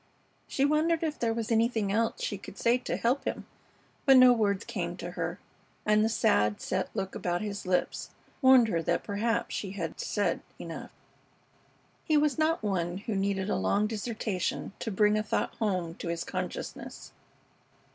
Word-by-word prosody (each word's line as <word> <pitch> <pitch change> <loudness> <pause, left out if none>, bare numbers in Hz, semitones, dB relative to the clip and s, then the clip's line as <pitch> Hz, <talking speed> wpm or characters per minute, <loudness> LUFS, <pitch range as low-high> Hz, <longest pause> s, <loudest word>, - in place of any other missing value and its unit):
She 275 - +1
wondered 315 +3 +2
if 305 -2 -2
there 230 -1 +1
was 230 0 -3
anything 225 -3 +2
else 225 +2 0
she 205 - -2
could 195 - -11
say 240 +2 +3
to - - -3
help 250 +4 +1
him, - - -3 0.6
but 270 -1 +8
no 255 -1 +9
words 205 -3 +1
came - - -4
to - - -6
her, - - -3 0.5
and 210 0 +4
the 220 - +2
sad, 105 - +2
set 185 0 -2
look 190 -2 -3
about 175 +2 -2
his 205 -2 -5
lips 180 -1 0 0.3
warned 260 -3 +7
her 165 -5 0
that - - 0
perhaps 225 +3 -1
she 195 -2 -3
had 170 -5 -5
said 200 -5 0 0.2
enough. 165 -1 -7 1.1
He 310 - +3
was 300 +1 +2
not 315 -4 +2
one 180 -4 -1
who 210 +2 -4
needed 195 0 0
a - - 0
long 205 +1 +1
dissertation 215 -4 -2
to - - -3
bring 210 +1 +3
a - - +1
thought 215 - -1
home 185 -7 -1
to - - -6
his 170 0 -2
consciousness. - - -6
210 Hz, 175 wpm, -29 LUFS, 190-235 Hz, 1.1 s, no